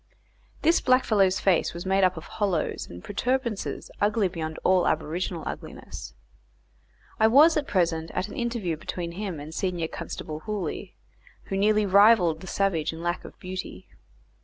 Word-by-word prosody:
This 330 +2 +4
blackfellow's 215 -7 +3
face 180 -3 +2
was 170 - -6
made 190 +1 +2
up 185 -1 +3
of 160 - -6
hollows 190 -7 -1
and 85 0 -10
protuberances 235 0 -2
ugly 205 0 +2
beyond 160 -2 -5
all 185 -1 +4
aboriginal 165 +2 -1
ugliness. - - -7 1.0
I 220 - +6
was 295 +8 +7
present 165 -3 0
at 190 - -1
an - - -9
interview 230 -9 -2
between 170 +2 -5
him 185 -3 -5
and 150 +2 -8
senior 175 -1 -1
constable 155 -1 -6
Hooley, 210 +2 -4 0.5
who 195 - -1
nearly 210 +2 +3
rivalled 195 -5 +5
the 190 - -9
savage 190 -7 0
in 165 +1 -8
lack 175 +1 -1
of - - -12
beauty. 185 - -7
185 Hz, 150 wpm, -26 LUFS, 165-210 Hz, 1.0 s, was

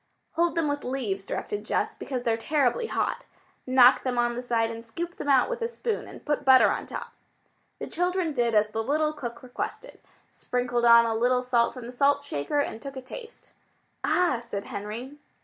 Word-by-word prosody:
"Hold 340 0 +1
them 330 -2 +1
with 290 0 -2
leaves," 220 -7 -3
directed 205 0 -4
Jess, - - -1
"because 255 -3 -5
they're 230 -2 +2
terribly 295 - +1
hot. - - -2 0.4
Knock 255 0 +6
them 255 -2 -2
on 240 0 +2
the 240 - -4
side 230 -2 0
and 230 0 -7
scoop 335 +10 -6
them 290 - -4
out 270 -2 +5
with - - -4
a 460 - +1
spoon 470 -1 -3
and - - -12
put 295 -1 0
butter 260 -1 +7
on - - -3
top." - - -6 0.7
The - - -5
children 355 -1 -1
did 240 -4 +1
as 210 0 +5
the 220 +1 -2
little 305 +5 +1
cook 240 -5 -7
requested, 250 -1 -6 0.3
sprinkled 245 -1 -1
on 235 0 +8
a 225 - 0
little 250 +3 +2
salt 240 -1 +2
from 250 -2 -8
the 240 - -7
salt 280 +3 +2
shaker, 150 - -3
and 285 -5 -1
took 275 -1 -7
a - - -5
taste. 455 - -10 0.5
"Ah!" 345 -10 +2
said 200 -4 -5
Henry. 235 +8 -6
255 Hz, 200 wpm, -27 LUFS, 235-295 Hz, 0.7 s, on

